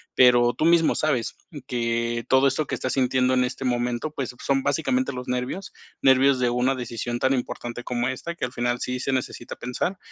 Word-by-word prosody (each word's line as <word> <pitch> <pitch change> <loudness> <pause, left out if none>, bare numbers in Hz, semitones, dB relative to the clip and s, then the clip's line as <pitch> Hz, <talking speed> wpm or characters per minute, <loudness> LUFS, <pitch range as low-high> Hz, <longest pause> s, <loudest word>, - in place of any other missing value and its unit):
Pero 120 -1 +6
tú 155 - -1
mismo 170 -1 +4
sabes, 140 -7 0 0.2
mm, 150 - -8
que 115 -2 -1
todo 130 +1 +5
esto 145 +3 0
que - - -6
estás 130 - -2
sintiendo 130 -1 +2
en 125 - +3
este 125 +2 -4
momento, 120 +2 -1
pues 135 -4 -5
son 135 -1 +1
básicamente 145 +2 -1 0.2
los 125 -1 -7
nervios, 125 +10 -3 0.3
nervios 135 0 +5
de 125 -1 +2
una 125 +2 +1
decisión 120 -1 -4
tan 130 +2 +2
importante 120 -1 -4
como 120 -1 -1
esta, 150 +6 -4
que - - -2
al 125 - -7
final 120 0 -1
sí 125 0 -3
se 135 - -1
necesita 130 -2 -3
pensar. 125 +10 -3
125 Hz, 200 wpm, -24 LUFS, 120-135 Hz, 0.3 s, Pero